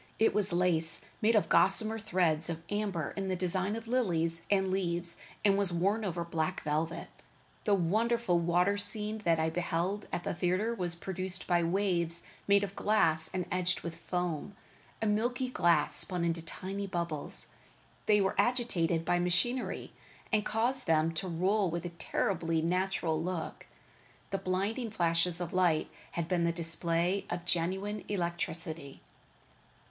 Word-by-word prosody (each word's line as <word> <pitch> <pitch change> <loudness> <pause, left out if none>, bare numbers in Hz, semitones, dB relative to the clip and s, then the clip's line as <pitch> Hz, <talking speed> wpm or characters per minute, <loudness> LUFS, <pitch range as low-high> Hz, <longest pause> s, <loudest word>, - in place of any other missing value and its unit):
It 225 - +3
was 200 -2 0
lace, 170 -2 +4 0.2
made 225 +1 +3
of 210 - +3
gossamer 215 +6 +4
threads 175 -7 +1
of 165 -1 -5
amber 200 -7 -2
in 195 -1 -3
the 185 - 0
design 185 +3 0
of 225 0 -7
lilies 170 -9 0
and 190 -2 +2
leaves, 175 -2 0 0.3
and 200 -1 +4
was 195 -3 +1
worn 195 +6 +1
over 175 -3 -2
black 170 +2 -2
velvet. 160 +3 -2 0.6
The 205 - +4
wonderful 215 +1 +1
water 180 +4 +2
scene 210 +1 +4
that 165 -1 +3
I 160 0 +1
beheld 175 +4 -2
at 175 - -3
the - - -2
theatre 185 +6 0
was 180 -6 -2
produced 185 +1 -4
by 175 -1 +2
waves 170 -2 +1 0.2
made 200 0 +4
of 200 0 -5
glass 160 -7 +3
and 180 -1 -2
edged 180 -1 0
with 170 -1 -6
foam, 180 +2 -3 0.5
a - - +1
milky 240 +4 0
glass 175 -8 +2
spun 180 -3 0
into 165 0 -1
tiny 195 +5 -5
bubbles. 170 -5 -3 0.6
They 210 -1 +5
were 190 - +1
agitated 195 -8 +1
by 175 - +2
machinery 180 +9 -1 0.4
that 215 -2 +2
caused 235 +4 +1
them 160 0 +3
to 185 +4 -3
roll 185 +3 +1
with 170 +1 -4
a - - -3
terribly 165 0 -1
natural 175 -2 0
look. 175 -1 -5 0.6
The 195 - -1
blinding 195 +6 -2
flashes 170 -3 0
of 175 -2 -4
lightning 175 -4 +2 0.2
had 170 -1 -2
been 175 -2 +1
the 170 - +2
display 170 +2 -1
of 175 0 -4
genuine 190 +5 -1
electricity. 170 -5 -3
180 Hz, 155 wpm, -31 LUFS, 170-200 Hz, 0.6 s, They